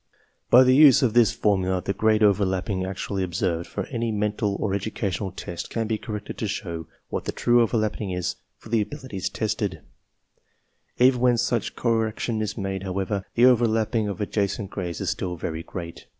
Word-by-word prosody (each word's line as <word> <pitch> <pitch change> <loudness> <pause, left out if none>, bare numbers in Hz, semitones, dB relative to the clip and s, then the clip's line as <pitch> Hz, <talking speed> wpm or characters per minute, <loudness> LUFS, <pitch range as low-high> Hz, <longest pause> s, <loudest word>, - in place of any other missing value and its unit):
By 125 +2 +8
the 130 0 +5
use 140 -1 +7
of 115 -4 +2
this 120 -5 +5
formula 95 -3 +1
the 100 - -2
grade 110 +1 +2
overlapping 95 -2 +1
actually 95 +1 -3
observed 85 -1 -1
for 100 - -4
any 115 -2 -1
mental 105 -1 -1
or 100 -1 -2
educational 100 -1 -2
test 85 -1 -6
can 115 -1 -2
be 110 0 -1
corrected 105 -3 -6
to 110 - -1
show 85 -5 -4 0.2
what - - -3
the - - -1
true 120 0 +3
overlapping 110 -3 0
is 90 -1 -2 0.2
for - - -14
the 115 -1 +2
abilities 105 - -4
tested/} 105 -6 -2 1.2
Even 125 0 +5
when 125 -1 +4
such 115 0 -1
correction 115 -1 0
is 110 - -3
made, 95 -2 -3
however, 95 +1 -2
the 120 - +3
^Overlapping 115 -3 +3
of 100 - -5
adjacent 100 -1 -2
grades 90 -4 -4
is - - 0
still 90 -1 -3
very 80 0 -4
great. 85 -1 -8
105 Hz, 175 wpm, -25 LUFS, 95-115 Hz, 1.2 s, By